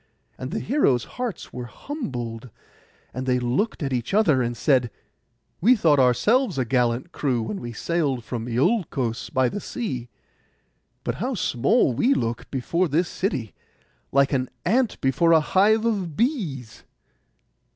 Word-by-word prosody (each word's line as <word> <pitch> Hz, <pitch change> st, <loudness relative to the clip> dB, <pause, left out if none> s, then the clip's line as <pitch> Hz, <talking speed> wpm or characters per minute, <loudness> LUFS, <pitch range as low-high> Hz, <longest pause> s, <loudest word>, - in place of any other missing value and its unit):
And -, -, -6 dB
the -, -, -3 dB
heroes' 135 Hz, -, +2 dB
hearts 245 Hz, -7 st, -6 dB
were 125 Hz, 0 st, -5 dB
humbled, 125 Hz, -, -6 dB, 0.6 s
and 130 Hz, +1 st, -4 dB
they 125 Hz, -1 st, +3 dB
looked 125 Hz, -, -1 dB
at 135 Hz, -1 st, -2 dB
each 125 Hz, -, -1 dB
other 155 Hz, -12 st, +4 dB
and 120 Hz, -1 st, -2 dB
said, 130 Hz, -5 st, +2 dB, 0.7 s
'We 240 Hz, +8 st, +6 dB
thought 155 Hz, -, +3 dB
ourselves 180 Hz, -, +3 dB
a 130 Hz, -, +1 dB
gallant 125 Hz, +5 st, 0 dB
crew 130 Hz, -8 st, -1 dB
when 105 Hz, -2 st, -5 dB
we 120 Hz, -1 st, -5 dB
sailed 140 Hz, 0 st, -1 dB
from 115 Hz, 0 st, -5 dB
Iolcos 130 Hz, -, 0 dB
by 130 Hz, -1 st, +2 dB
the 205 Hz, -, -3 dB
sea; 130 Hz, -, -4 dB, 0.9 s
but -, -, -1 dB
how 255 Hz, +2 st, -1 dB
small 180 Hz, -, +2 dB
we 255 Hz, -, +2 dB
look 115 Hz, 0 st, -3 dB
before 170 Hz, +7 st, 0 dB
this 165 Hz, +4 st, +1 dB
city, 135 Hz, -, -2 dB, 0.6 s
like 140 Hz, +1 st, +3 dB
an 130 Hz, -2 st, 0 dB, 0.2 s
ant 235 Hz, +6 st, +1 dB
before 165 Hz, +6 st, +3 dB
a 160 Hz, -, +7 dB
hive 210 Hz, +8 st, +3 dB
of 190 Hz, -9 st, -1 dB
bees. 175 Hz, -, -2 dB
140 Hz, 150 wpm, -24 LUFS, 125-200 Hz, 0.9 s, a